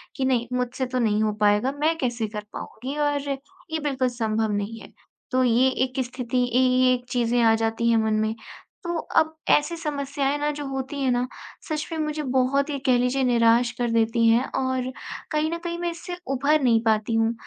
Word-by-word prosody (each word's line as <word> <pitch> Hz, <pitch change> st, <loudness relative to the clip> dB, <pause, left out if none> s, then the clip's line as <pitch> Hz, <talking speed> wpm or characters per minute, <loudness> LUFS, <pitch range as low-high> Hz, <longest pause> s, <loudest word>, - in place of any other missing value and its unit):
कि 265 Hz, -, -1 dB
नहीं, 245 Hz, -2 st, +1 dB
मुझसे 250 Hz, +1 st, -1 dB
तो 255 Hz, 0 st, -2 dB
नहीं 215 Hz, -3 st, +2 dB
हो 215 Hz, -, +1 dB
पाएगा, 210 Hz, +5 st, +3 dB
मैं 305 Hz, +3 st, 0 dB
कैसे 240 Hz, -5 st, -1 dB
कर 210 Hz, 0 st, -6 dB
पाऊँगी 265 Hz, +5 st, -6 dB
और 290 Hz, -1 st, +1 dB
ये 320 Hz, +4 st, -6 dB
बिल्कुल 265 Hz, -3 st, 0 dB
संभव 220 Hz, -2 st, -1 dB
नहीं 205 Hz, +3 st, -3 dB
है। -, -, -13 dB, 0.4 s
तो 255 Hz, 0 st, +3 dB
ये 250 Hz, +2 st, +4 dB, 0.2 s
एक 255 Hz, 0 st, -6 dB
स्थिति, 250 Hz, 0 st, -2 dB
इ 245 Hz, +1 st, +1 dB
ये 255 Hz, 0 st, +4 dB
एक 245 Hz, 0 st, -3 dB
चीज़ें 240 Hz, 0 st, +1 dB
आ 225 Hz, -1 st, +5 dB
जाती 225 Hz, +1 st, 0 dB
हैं 230 Hz, -, +4 dB
मन 220 Hz, 0 st, +1 dB
में, 220 Hz, +1 st, 0 dB, 0.5 s
तो 345 Hz, -1 st, -2 dB, 0.2 s
अब 315 Hz, 0 st, +3 dB
ऐसी 295 Hz, +3 st, +3 dB
समस्याएँ 285 Hz, -2 st, -2 dB
ना 295 Hz, 0 st, 0 dB
जो 295 Hz, 0 st, -6 dB
होती 270 Hz, +1 st, -4 dB
हैं 265 Hz, -, +1 dB
ना, 245 Hz, +1 st, 0 dB, 0.4 s
सच 305 Hz, -1 st, -2 dB
में 325 Hz, -, -3 dB
मुझे 305 Hz, 0 st, -2 dB
बहुत 265 Hz, +2 st, +1 dB
ही 285 Hz, -, -2 dB
कह 255 Hz, -2 st, +4 dB
लीजिए 250 Hz, +2 st, +1 dB
निराश 235 Hz, -1 st, +4 dB
कर 240 Hz, -1 st, 0 dB
देती 230 Hz, 0 st, +2 dB
हैं 230 Hz, +3 st, +4 dB
और 260 Hz, -1 st, -1 dB, 0.4 s
कहीं 310 Hz, +1 st, 0 dB
न 335 Hz, -, -2 dB
कहीं 340 Hz, -1 st, -3 dB
मैं 345 Hz, 0 st, -1 dB
इससे 350 Hz, +1 st, -7 dB, 0.2 s
उभर 285 Hz, +3 st, +2 dB
नहीं 230 Hz, -4 st, +3 dB
पाती 220 Hz, 0 st, +1 dB
हूँ, 225 Hz, 0 st, +2 dB
255 Hz, 205 wpm, -24 LUFS, 230-285 Hz, 0.5 s, आ